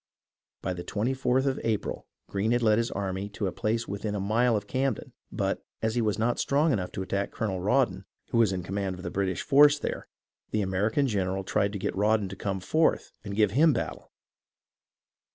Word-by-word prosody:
By 95 - -1
the 90 -1 -6
24th 130 +5 0
of 135 -1 0
April 110 -3 -2 0.2
Greene 105 +4 0
had 120 0 +1
led 110 0 +4
his 115 - 0
army 95 0 -3
to 105 - -1
a 95 - 0
place 115 +4 -1
within 105 +1 -3
a - - -2
mile 110 +4 +2
of 105 - -5
Camden; 135 +1 -2 0.2
but, - - -1 0.2
as 110 0 +1
he 120 - +1
was 105 -2 0
not 115 +2 +1
strong 145 +2 +2
enough 90 -5 -2
to 95 - -3
attack 100 +1 -1
Colonel 95 -4 -2
Rawdon, 100 -3 +1 0.3
who 115 - +2
was 110 -4 +4
in 90 -2 -3
command 95 0 -2
of 90 - -10
the 90 - -4
British 95 -2 -1
there, 145 +1 +4 0.4
the 105 -1 0
American 105 +9 +1
general 95 -5 -1
tried 100 +1 +1
to - - -2
get 95 - -3
Rawdon 105 0 +2
to 95 - -7
come 95 -1 -3
forth 155 - +1
and 100 -3 -5
give 105 -2 +3
him 150 +7 +5
battle. 115 - -4
105 Hz, 200 wpm, -28 LUFS, 95-120 Hz, 0.4 s, him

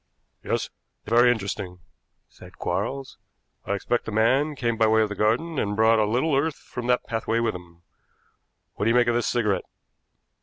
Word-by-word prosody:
"Yes, - - -2 0.3
very 120 +2 +5
interesting," 100 -4 -4 0.5
said - - -16
Quarles. 135 -1 -3 0.5
"I 100 - -1
expect 120 +4 -1
the - - -5
man 130 +8 +2
came 120 -3 -1
by 110 0 +3
way 110 0 +4
of 105 - -2
the 105 - -5
garden 130 +10 0
and 105 0 -1
brought 110 +1 +4
a 105 - +3
little 130 +7 +1
earth 145 +2 +1
from 120 -1 -7
that 125 0 +1
pathway 115 0 -1
with 115 -1 0
him. 85 -1 -12 0.9
What 100 - -3
do - - +3
you 115 - +3
make 120 - +5
of 120 - +1
this 120 -1 0
cigarette?" 105 -6 0
115 Hz, 185 wpm, -25 LUFS, 105-125 Hz, 0.9 s, very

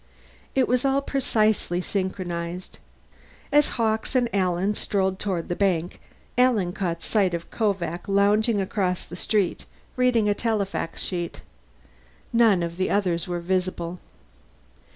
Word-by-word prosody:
It 265 -1 +3
was 250 0 +1
all 275 0 +2
precisely 215 -9 +1
synchronized. 180 -2 -4 0.7
As 295 0 +5
Hawkes 220 +2 0
and 245 -2 +2
Alan 185 +1 +1
strolled 190 -2 0
toward 185 -5 -2
the 175 - -2
bank, 180 -3 0 0.4
Alan 220 -9 +3
caught 170 -4 -3
sight 195 -5 +2
of 170 0 -7
Kovak 185 -6 -1
lounging 205 +2 +3
across 190 -2 -1
the 175 - -9
street, 195 0 0 0.3
reading 250 -4 +3
a 205 - +4
telefax 205 -6 -2
sheet. 175 -2 -3 0.9
None 225 -6 +5
of 170 0 -4
the 185 - 0
others 180 -3 0
were 175 -1 -3
visible. 180 -1 -2
195 Hz, 130 wpm, -25 LUFS, 175-220 Hz, 0.9 s, As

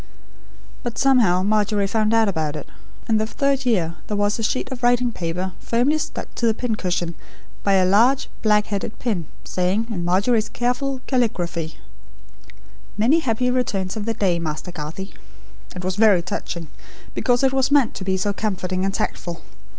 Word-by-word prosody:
But, 240 -2 -5
somehow, 230 -10 +4
Margery 210 0 +2
found 215 +2 +1
out 225 -1 +4
about 160 -5 -1
it; 150 - -6 0.4
and 220 -1 +3
the 220 - 0
third 275 +1 0
year 175 -7 +1
there 210 - -2
was 205 +2 +1
a - - -1
sheet 255 +4 -1
of 255 -2 -5
writing 245 0 +3
paper 180 0 -3
firmly 255 +7 +1
stuck - - -5
to 235 - 0
the 220 - +2
pincushion 185 -8 -1 0.5
by 200 - +3
a 190 -1 +4
large 235 +8 +4
black 210 -1 +3
headed 205 +2 -4
pin, 195 - -2 0.2
saying, 185 +5 0
in 180 -5 -2
Margery's 205 +6 +2
careful 255 +2 -1
caligraphy: 175 - -1 1.2
'Many 250 +10 +4
happy 250 -3 0
returns 200 -7 -1
of 215 -2 -4
the 225 0 -1
day, 185 -5 +1
Master 160 +2 -4
Garthie.' 165 +4 -6 0.6
It 180 - -6
was 185 +1 -1
very 205 -5 +5
touching, 170 -1 -4 0.5
because 245 0 +1
it 265 0 +3
was 265 0 +2
meant 285 -5 +4
to - - -6
be 190 0 0
so 205 +2 0
comforting 185 -3 -2
and 195 - +1
tactful. 170 -1 -3
210 Hz, 170 wpm, -22 LUFS, 185-240 Hz, 1.2 s, very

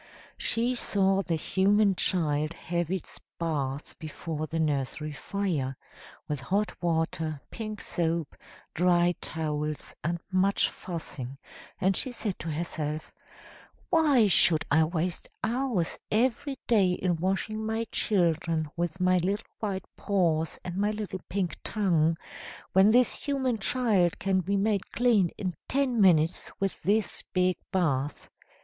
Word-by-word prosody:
"She 235 +2 +1
saw 195 -5 +2
the 170 -4 -1
human 200 +5 +3
child 155 -4 +1
have 170 -1 -2
its 190 -1 -4 0.2
bath 145 -4 -3
before 155 0 -5
the 165 - -3
nursery 150 0 -1
fire, 150 -6 -2 0.5
with 150 -4 -2
hot 200 +9 0
water, 160 -2 -1
pink 215 -2 -5
soap, 165 -2 -1 0.4
dry 175 0 +3
towels, 150 -2 -3
and 170 +2 -1
much 190 +2 +3
fussing, 140 -7 -6 0.4
and 190 0 +2
she 255 - 0
said 215 -5 -3
to 165 - -4
herself, 155 -1 -3 0.8
'Why 295 -8 +5
should 160 -4 +4
I 160 +2 +5
waste 170 +2 -2
hours 235 -7 0
every 260 +5 +1
day 200 -6 +4
in 180 -1 0
washing 195 +5 -1
my 220 +1 -1
children 165 -5 +1
with 175 +1 -2
my 185 0 +4
little 195 +5 -1
white 195 -4 -3
paws 165 -5 +1
and 180 0 -5
my 205 +1 +2
little 210 -4 -4
pink 190 -3 -1
tongue, 165 -6 +2 0.6
when 190 +2 +6
this 245 +2 +3
human 265 -5 0
child 205 -5 +2
can 195 -1 +1
be 200 +3 0
made 200 -1 0
clean 230 -7 +3
in 185 -3 -2
ten 260 -4 +1
minutes 165 -3 +4
with 195 -1 -2
this 210 +1 +1
big 185 0 +3 0.2
bath. 145 -7 -1
180 Hz, 130 wpm, -28 LUFS, 160-205 Hz, 0.8 s, when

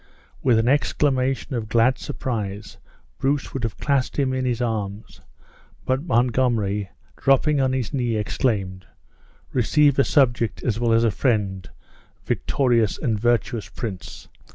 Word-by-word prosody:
With 125 -4 +3
an 110 +1 +1
exclamation 135 -1 +1
of 115 -3 -3
glad 120 +3 +3
surprise 105 -5 -5 0.4
Bruce 140 +1 -1
would 135 - -3
have 115 -4 -3
clasped 140 -3 0
him 135 -2 +1
in 130 0 -1
his 120 -2 -1
arms; 110 -3 -4 0.6
but 130 +1 0
Montgomery 115 - +1 0.3
dropping 140 +2 +3
on 130 -1 +2
his 130 -5 -2
knee, 120 -4 0
exclaimed, 100 -4 -2 0.7
"Receive 140 +3 +3
a - - +6
subject 120 -6 +1
as 115 -2 -1
well 120 -1 +1
as 115 +1 +4
a 115 - +3
friend, 100 -5 -1 0.6
victorious 120 -6 +1
and 110 -3 -1
virtuous 115 -3 0
prince! 100 -4 -7
120 Hz, 135 wpm, -23 LUFS, 110-130 Hz, 0.7 s, a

